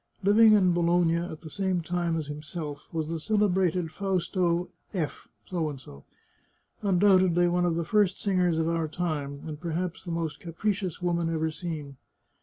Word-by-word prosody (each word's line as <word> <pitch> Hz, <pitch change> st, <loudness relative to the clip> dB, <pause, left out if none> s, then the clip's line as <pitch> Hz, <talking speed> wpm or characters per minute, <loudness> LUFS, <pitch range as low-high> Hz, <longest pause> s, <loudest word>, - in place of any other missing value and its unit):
Living 215 Hz, +3 st, +7 dB
in 185 Hz, -4 st, +5 dB
Bologna 170 Hz, -1 st, +3 dB
at 170 Hz, -2 st, -5 dB
the 160 Hz, -, -9 dB
same 190 Hz, 0 st, 0 dB
time 170 Hz, 0 st, -1 dB
as 155 Hz, -, -3 dB
himself, 150 Hz, 0 st, -6 dB
was 160 Hz, -2 st, -2 dB
the 165 Hz, 0 st, -3 dB
celebrated 185 Hz, -4 st, +1 dB
Fausta 180 Hz, -2 st, 0 dB, 0.3 s
F, 160 Hz, -5 st, -3 dB, 1.5 s
undoubtedly 185 Hz, -3 st, +4 dB
one 175 Hz, 0 st, +2 dB
of 165 Hz, -, 0 dB
the 170 Hz, 0 st, -1 dB
first 205 Hz, 0 st, +2 dB
singers 180 Hz, -4 st, +1 dB
of 160 Hz, 0 st, +1 dB
our 165 Hz, -1 st, 0 dB
time, 150 Hz, -4 st, -3 dB
and 155 Hz, -1 st, -7 dB
perhaps 175 Hz, +1 st, -3 dB
the 180 Hz, -, -8 dB
most 165 Hz, -2 st, -3 dB
capricious 185 Hz, +1 st, -3 dB
woman 170 Hz, -1 st, 0 dB
ever 160 Hz, -1 st, 0 dB
seen. 155 Hz, -5 st, -6 dB
175 Hz, 150 wpm, -28 LUFS, 160-185 Hz, 1.5 s, Living